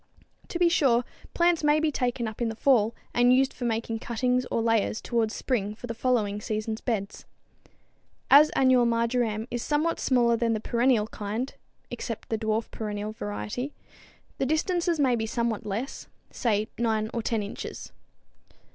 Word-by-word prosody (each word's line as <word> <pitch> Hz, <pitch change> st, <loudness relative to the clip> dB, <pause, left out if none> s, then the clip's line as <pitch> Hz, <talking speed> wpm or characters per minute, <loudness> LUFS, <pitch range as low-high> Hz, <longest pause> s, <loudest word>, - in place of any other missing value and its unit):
To -, -, -4 dB
be 350 Hz, 0 st, +4 dB
sure, 265 Hz, -8 st, +3 dB, 0.3 s
plants 345 Hz, -2 st, +3 dB
may 295 Hz, +1 st, +4 dB
be 310 Hz, 0 st, +1 dB
taken 245 Hz, -4 st, -1 dB
up 220 Hz, +2 st, -7 dB
in 235 Hz, -, +1 dB
the 225 Hz, -, -5 dB
fall 235 Hz, -3 st, +3 dB, 0.2 s
and 245 Hz, +1 st, +4 dB
used 265 Hz, +1 st, +3 dB
for 245 Hz, -, -5 dB
making 225 Hz, -1 st, -1 dB
cuttings 250 Hz, +2 st, 0 dB
or -, -, 0 dB
layers 225 Hz, -1 st, +1 dB
towards 230 Hz, -2 st, -1 dB
spring 210 Hz, -5 st, -1 dB
for 235 Hz, -, -9 dB
the 230 Hz, -, -4 dB
following 220 Hz, -4 st, 0 dB
seasons 215 Hz, +1 st, -3 dB
beds. 210 Hz, -5 st, -3 dB, 1.1 s
As 295 Hz, +2 st, +9 dB
annual 255 Hz, -2 st, +4 dB
marjoram 230 Hz, -1 st, 0 dB
is 240 Hz, -, -2 dB
somewhat 310 Hz, +5 st, 0 dB
smaller 240 Hz, -3 st, +3 dB
than 230 Hz, 0 st, +1 dB
the 220 Hz, -, -1 dB
perennial 235 Hz, 0 st, +2 dB
kind 215 Hz, +4 st, -4 dB, 0.4 s
(except -, -, -5 dB
the 225 Hz, -, 0 dB
dwarf 220 Hz, 0 st, -1 dB
perennial 210 Hz, -1 st, -4 dB
variety), 105 Hz, -, -5 dB, 0.7 s
the -, -, +1 dB
distances 340 Hz, +2 st, 0 dB
may 260 Hz, -4 st, +3 dB
be 225 Hz, -1 st, -2 dB
somewhat 230 Hz, -2 st, -2 dB
less, 225 Hz, +8 st, -4 dB, 0.2 s
say 215 Hz, -3 st, 0 dB
9 220 Hz, -2 st, 0 dB
or 235 Hz, -, -1 dB
10 220 Hz, -1 st, -1 dB
inches. 200 Hz, -, -7 dB
235 Hz, 165 wpm, -27 LUFS, 220-255 Hz, 1.1 s, As